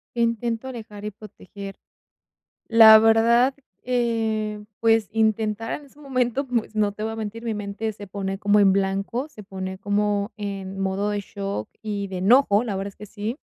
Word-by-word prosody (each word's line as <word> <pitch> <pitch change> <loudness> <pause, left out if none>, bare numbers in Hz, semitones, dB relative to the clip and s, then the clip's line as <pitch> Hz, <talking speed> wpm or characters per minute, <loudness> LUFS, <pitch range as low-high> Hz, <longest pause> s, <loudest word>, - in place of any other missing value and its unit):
¿Qué 235 - -1
intento? 230 +1 -1
Alejar 215 -5 -8
y 210 - -3
proteger. 200 -1 -10 0.9
La 220 -1 +9
verdad, 230 +4 +4 0.3
eh, 225 -4 -1 0.2
pues, 225 -2 +3
intentar 220 0 0
en 295 - -15
ese 280 +1 -21
momento, 260 -1 -1
pues, 235 -3 -2
no 210 -1 +2
te 210 +1 -7
voy 220 0 -2
a - - -6
mentir, 220 +1 -5
mi 225 - -1
mente 210 +1 -3
se 205 -1 -10
pone 195 0 -4
como 205 0 +3
en 195 -2 +5
blanco, 195 +7 -1
se 215 - -12
pone 190 -1 -6
como 205 0 0
en 195 -2 -5
modo 195 +1 -1
de 205 - -1
shock 195 - -5
y 205 -2 -3
de 190 -1 -5
enojo, 210 +2 +4
la 210 -4 -2
verdad 195 +1 -3
es 195 - -18
que 210 - -9
sí. 210 +4 -5
210 Hz, 180 wpm, -24 LUFS, 200-230 Hz, 0.9 s, La